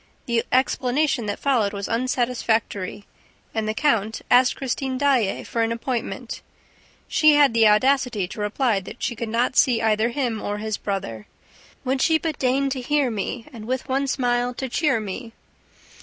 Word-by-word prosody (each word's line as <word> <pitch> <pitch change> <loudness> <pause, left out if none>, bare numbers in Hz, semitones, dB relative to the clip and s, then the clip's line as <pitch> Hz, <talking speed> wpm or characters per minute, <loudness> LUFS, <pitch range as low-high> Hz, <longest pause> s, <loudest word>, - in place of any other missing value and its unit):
The 235 -1 +1
explanation 260 -1 +1
that 205 - -2
followed 235 -8 +1
was 200 -1 -4
unsatisfactory 230 -5 -1 0.5
and 220 -1 -1
the 215 - -1
count 225 -6 0
asked 250 +1 +5
Christine 265 0 -3
Daae 260 -7 +1
for 230 - -2
an 225 0 +1
appointment. 235 +1 -4 0.7
She 310 -1 +5
had 285 -4 +5
the 225 -1 +5
audacity 235 -2 +2
to 215 - -7
reply 210 +1 +1
that 195 +5 -10
she 240 - -1
could 225 0 -4
not 240 +3 0
see 245 -5 +4
either 220 +1 +2
him 240 -4 -2
or 205 0 -3
his 215 0 -3
brother... 115 - -4 0.6
"Would 260 +1 0
she 320 -1 +4
but 315 -2 -4
deign 270 +1 +1
to 260 -1 -2
hear 285 -1 +1
me 225 +3 -4
And 220 -3 -9
with 260 +1 -2
one 270 +1 0
smile 245 -2 0
to 265 - -3
cheer 265 -1 +1
me 220 +3 -6
240 Hz, 170 wpm, -23 LUFS, 220-265 Hz, 0.7 s, asked